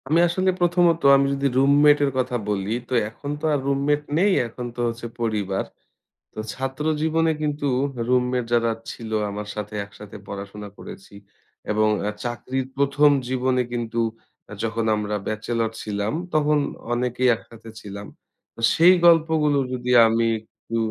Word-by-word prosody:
আমি 155 +4 +3
আসলে 185 +2 0
প্রথমত 175 -1 +3 0.2
আমি 140 0 +2
যদি 140 0 0
রুমমেট 145 +2 +5
এর 140 - 0
কথা 125 -1 0
বলি 100 0 -1 0.2
তো - - -3 0.2
এখন 140 +5 -9
তো - - -2
আর 145 - +1
রুমমেট 140 +2 +1 0.2
নেই, 200 +4 +4 0.2
এখন 120 +2 -7
তো - - -10
হচ্ছে 115 0 -4
পরিবার। 105 -4 -1 0.7
তো - - -8
ছাত্র 135 +2 -4 0.2
জীবনে 160 +1 +2
কিন্তু 145 -1 -1 0.4
রুমমেট 125 0 +1
যারা 115 -1 +3 0.2
ছিল 115 -2 -9 0.2
আমার 105 +1 -6
সাথে 105 0 -5
একসাথে 100 0 -12
পড়াশোনা 100 +1 -7
করেছি। 200 - -11 0.6
এবং 110 0 +2 0.2
আ - - +1
চাকরির 125 +2 -3
প্রথম 140 +1 +4 0.2
জীবনে 130 0 +1
কিন্তু 115 -1 -3 0.6
যখন 115 0 -1
আমরা 105 0 -2
ব্যাচেলর 110 +1 -2
ছিলাম 105 +1 -2 0.2
তখন 150 -1 +3 0.3
অনেকেই 125 +1 +1
একসাথে 115 0 -14
ছিলাম। 100 0 -8 0.5
তো - - -15 0.2
সেই 170 +3 +7
গল্পগুলো 160 -3 +4 0.2
যদি 125 0 -4 0.2
আমি 115 +1 +1 0.2
একটু 115 +1 -7
125 Hz, 145 wpm, -23 LUFS, 110-150 Hz, 0.7 s, সেই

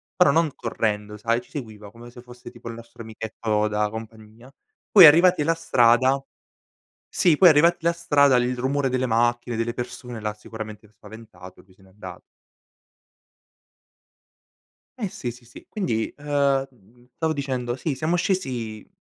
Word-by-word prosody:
però 180 -6 +4
non 160 -1 +1
correndo 105 -2 -3
sai, 115 +3 -1
ci - - -23
seguiva, 110 -7 -8
come 120 +1 -13
se 120 - -13
fosse 125 0 -13
tipo 120 -1 -13
il 115 - -7
nostro 115 0 -13
amichetto 110 -1 -3
da 105 0 -1
compagnia, 110 +3 -11 0.4
poi 190 -5 +10
arrivati 170 +2 +6
alla 165 +3 +1
strada 130 -2 +3 0.9
sì, 165 -4 +2
poi 180 -2 +7
arrivati 160 +3 +4
alla 170 - +3
strada, 145 -5 +3
il 125 +1 0
rumore 135 +2 -1
delle 130 0 -1
macchine, 120 +1 0
delle 115 +1 -2
persone, 120 -1 -7
l'ha 105 -1 -4
sicuramente 110 0 -10
spaventato 105 -3 -14
e - - -28
lui 95 - -24
se 95 - -27
n'è 95 - -21
andato. 95 -2 -11 2.8
Eh 215 -6 -3
sì, 120 -8 -6
sì, 120 +1 -16
sì, 120 - -15
quindi, 165 - -2
ehm, 140 -2 0 0.5
stavo 160 -1 -1
dicendo, 130 -4 -3
sì 135 +2 -3
siamo 155 +6 -1
scesi, 130 - -3
120 Hz, 155 wpm, -23 LUFS, 110-145 Hz, 2.8 s, poi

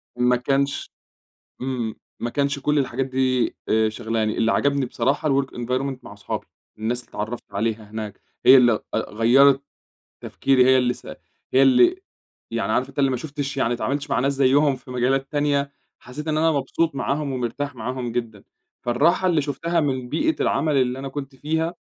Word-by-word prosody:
ما 125 0 +3
كانش 140 +3 -1 0.7
إمم. 125 -4 -3 0.2
ما 120 - -2
كانش 140 +2 -1
كل 150 +2 +1
الحاجات 135 -1 -1
دي 130 -1 0
آآ 110 0 +3
شاغلاني، 110 -1 -2
اللي 115 0 +2
عجبني 140 -1 +1
بصراحة 140 +5 0
الwork 135 0 +2
environment 130 +3 -2
مع - - -10
اصحابي. 100 0 -5 0.3
الناس 115 +3 -1
اللي - - -25
اتعّرفت 110 +3 -5
عليها 110 +1 -2
هناك 110 -2 -6 0.2
هي 135 - +9
اللي 120 -4 +4
أ - - +1
غيّرت 130 +5 +5 0.6
تفكيري 130 -2 +2
هي 130 0 +6
اللي 125 -1 +2
س - - -16 0.5
هي 130 - +5
اللي 360 - +5 0.5
يعني - - -1
عارف - - 0
أنت - - -7
اللي 135 -1 +4
ما 130 - -1
شُفتش 140 0 -5
يعني 125 - +1
ما 120 - 0
اتعاملتش 140 +4 -2
مع 120 - +1
ناس 140 +2 +1
زيّهم 140 +1 +3
في 125 0 -13
مجالات 135 +2 0
تانية، 145 -1 0 0.3
حسّيت 150 +5 -8
إن 155 -1 0
أنا 160 +1 +3
مبسوط 150 +2 -1
معاهم 140 +1 -1
ومرتاح 130 +3 -3
معاهم 125 +1 -4
جدًا. 115 -4 -4 0.4
فالراحة 155 +10 +2
اللي 165 -4 +2
شُفتها 160 +5 -1
من 130 -5 -1
بيئة 320 - +1
العمل 150 +1 +1
اللي 130 0 +1
أنا 135 - -5
كنت 135 0 -7
فيها، 160 +5 -1
135 Hz, 180 wpm, -23 LUFS, 120-140 Hz, 0.7 s, هي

